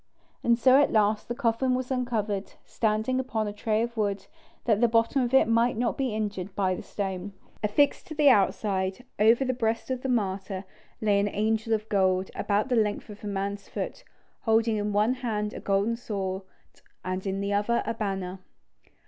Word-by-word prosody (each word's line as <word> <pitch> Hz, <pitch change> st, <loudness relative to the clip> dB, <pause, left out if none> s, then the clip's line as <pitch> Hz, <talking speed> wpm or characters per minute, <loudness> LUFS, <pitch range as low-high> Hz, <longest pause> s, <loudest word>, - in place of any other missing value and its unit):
And 235 Hz, 0 st, +4 dB
so 260 Hz, +3 st, +6 dB
at 285 Hz, -, +2 dB
last 215 Hz, -1 st, +2 dB
the 240 Hz, -, -3 dB
coffin 250 Hz, +1 st, +1 dB
was 255 Hz, +1 st, -3 dB
uncovered, 220 Hz, -6 st, -2 dB
standing 220 Hz, +3 st, 0 dB
upon 225 Hz, -5 st, -2 dB
a 205 Hz, -, -4 dB
tray 215 Hz, +1 st, 0 dB
of 235 Hz, 0 st, -4 dB
wood, 200 Hz, -3 st, -1 dB, 0.4 s
that 220 Hz, -2 st, +2 dB
the 240 Hz, -, +6 dB
bottom 230 Hz, +4 st, +2 dB
of 240 Hz, -1 st, 0 dB
it 265 Hz, -3 st, +5 dB
might 230 Hz, +1 st, +2 dB
not 240 Hz, 0 st, 0 dB
be 260 Hz, -5 st, -1 dB
injured 205 Hz, -3 st, -3 dB
by 190 Hz, -2 st, +1 dB
the -, -, -5 dB
stone. 195 Hz, -1 st, -4 dB, 0.3 s
Affixed 280 Hz, -, +2 dB
to 310 Hz, -, -7 dB
the 295 Hz, -1 st, +4 dB
outside, 195 Hz, -2 st, +2 dB
over 230 Hz, +5 st, +5 dB
the 255 Hz, -, 0 dB
breast 230 Hz, 0 st, -1 dB
of 255 Hz, -1 st, -2 dB
the 265 Hz, -, -3 dB
martyr, 195 Hz, -4 st, -1 dB, 0.4 s
lay 205 Hz, -2 st, +3 dB
an 200 Hz, -, +1 dB
angel 220 Hz, +2 st, 0 dB
of 215 Hz, -1 st, 0 dB
gold, 190 Hz, -2 st, +1 dB
about 205 Hz, +3 st, 0 dB
the 250 Hz, -, +2 dB
length 210 Hz, -1 st, 0 dB
of 205 Hz, -, -12 dB
a -, -, -4 dB
man's 200 Hz, 0 st, -3 dB
foot, -, -, -5 dB, 0.4 s
holding 225 Hz, -1 st, +2 dB
in 210 Hz, 0 st, -1 dB
one 210 Hz, +4 st, +3 dB
hand 215 Hz, -5 st, -2 dB
a -, -, -6 dB
golden 200 Hz, +4 st, +1 dB
sword 195 Hz, -5 st, -3 dB, 0.6 s
and 185 Hz, +1 st, -3 dB
in 195 Hz, 0 st, -1 dB
the 200 Hz, 0 st, -1 dB
other 210 Hz, +4 st, +1 dB
a -, -, -1 dB
banner. 195 Hz, -4 st, -3 dB
215 Hz, 190 wpm, -27 LUFS, 200-235 Hz, 0.6 s, so